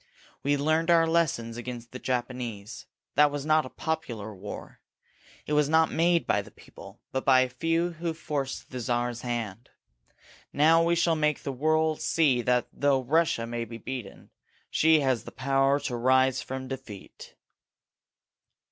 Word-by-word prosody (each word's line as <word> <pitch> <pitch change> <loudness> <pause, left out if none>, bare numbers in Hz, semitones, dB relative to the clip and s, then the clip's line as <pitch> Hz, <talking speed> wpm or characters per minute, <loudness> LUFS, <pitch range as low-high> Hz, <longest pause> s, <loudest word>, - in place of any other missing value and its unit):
We 145 +1 +1
learned 155 +3 +1
our 165 -1 +5
lessons 155 -9 0
against 120 -1 -7
the 130 - -7
Japanese. 120 -4 -4 0.3
That 150 +1 +5
was 145 -1 -5
not 155 -2 +3
a - - -11
popular 120 -11 -4
war. 100 +2 -9 0.7
It 150 - -3
was 150 -1 +3
not 160 0 +4
made 170 +1 +2
by - - +1
the - - -13
people, - - -14
but 130 - -2
by 130 -1 +5
a 130 - +1
few 165 +7 0
who 165 0 -4
forced 145 -4 -4
the 130 - -5
Czar's 120 0 -1
hand. 115 -3 -4 0.8
Now 160 +3 +5
we 170 +1 +2
shall 165 -1 +2
make 150 -2 0
the 140 - -3
world 155 +3 +1
see 140 -7 +2
that 125 0 +1
though 140 -2 +1
Russia 155 -3 +1
may 120 0 -3
be 115 0 -8
beaten, 120 -3 -8 0.4
she 160 -1 +4
has 130 -4 0
the - - -10
power 135 +2 +1
to 125 - -3
rise 130 +2 +3
from 130 0 -6
defeat." 130 -7 -9
135 Hz, 160 wpm, -27 LUFS, 120-155 Hz, 0.8 s, our